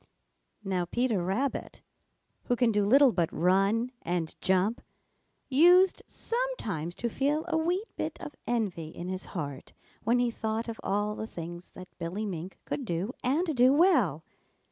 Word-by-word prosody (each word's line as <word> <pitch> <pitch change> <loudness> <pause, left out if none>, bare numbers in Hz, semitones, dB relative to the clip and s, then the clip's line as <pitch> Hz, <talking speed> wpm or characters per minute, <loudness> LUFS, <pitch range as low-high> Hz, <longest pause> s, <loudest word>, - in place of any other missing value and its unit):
Now 185 -3 -1
Peter 235 0 0
Rabbit, 235 +10 -2 0.6
who 245 - +1
can 240 -1 +3
do 205 -1 +2
little 265 +6 +6
but 175 -4 0
run 195 +7 +2
and 170 -2 -2
jump, 190 +5 +1 0.7
used 355 +7 +5
sometimes 225 - -3
to 240 - -2
feel 290 +6 0
a 330 - -1
wee 345 +5 +1
bit - - -3
of 295 - -7
envy 205 -9 -1
in 175 +2 -7
his 185 0 -4
heart 140 -4 -5 0.3
when 235 +3 +2
he 245 -1 +2
thought 220 0 -3
of 230 -1 -6
all 205 +2 0
the 220 - -5
things 175 -1 -8
that 185 -1 -12
Billy 180 +6 -3
Mink 180 -2 -5
could 280 - -3
do 195 +2 -2
and 310 +5 +1
do 250 +1 +6
well. 260 - +3
220 Hz, 155 wpm, -29 LUFS, 180-265 Hz, 0.7 s, little